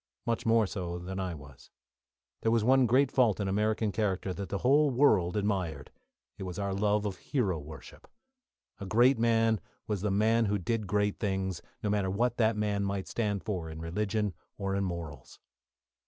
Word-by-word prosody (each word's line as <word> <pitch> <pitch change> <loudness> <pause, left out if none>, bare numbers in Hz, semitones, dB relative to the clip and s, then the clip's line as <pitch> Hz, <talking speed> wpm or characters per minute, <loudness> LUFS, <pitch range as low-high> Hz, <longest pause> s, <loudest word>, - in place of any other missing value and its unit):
Much 115 -1 -1
more 115 -1 +4
so 90 -3 -4
than 95 +2 -6
I 90 -3 -3
was. 70 -3 -14 0.7
There 115 - +1
was 115 -2 +2
one 130 +1 +4
great 130 +3 +3
fault 115 -7 +3
in 100 - -1
American 105 +2 0
character 95 -3 -1
that 95 0 -6
the 100 - -1
whole 145 +6 +4
world 110 -9 +3
admired; 95 -8 -2 0.5
it - - -8
was 90 -2 -5
our 100 -1 -2
love 105 +1 +1
of 95 -3 -3
hero 95 - -1
worship. 75 -2 -12 0.7
A 100 - -6
great 120 +5 +4
man 115 -1 +2 0.2
was 105 -4 -2
the 105 - 0
man 110 +3 +3
who 105 0 +1
did 105 +3 -2
great 105 +1 0
things, 95 -4 -2 0.2
no 105 - 0
matter 100 -2 +1
what 120 +5 0
that 110 -2 +2
man 105 -1 0
might 100 -1 -2
stand 105 -4 -2
for 90 -6 -3
in 80 0 -8
religion 105 +4 -1 0.2
or 100 -1 -2
in 100 - 0
morals. 85 -5 -6
105 Hz, 185 wpm, -30 LUFS, 95-110 Hz, 0.7 s, more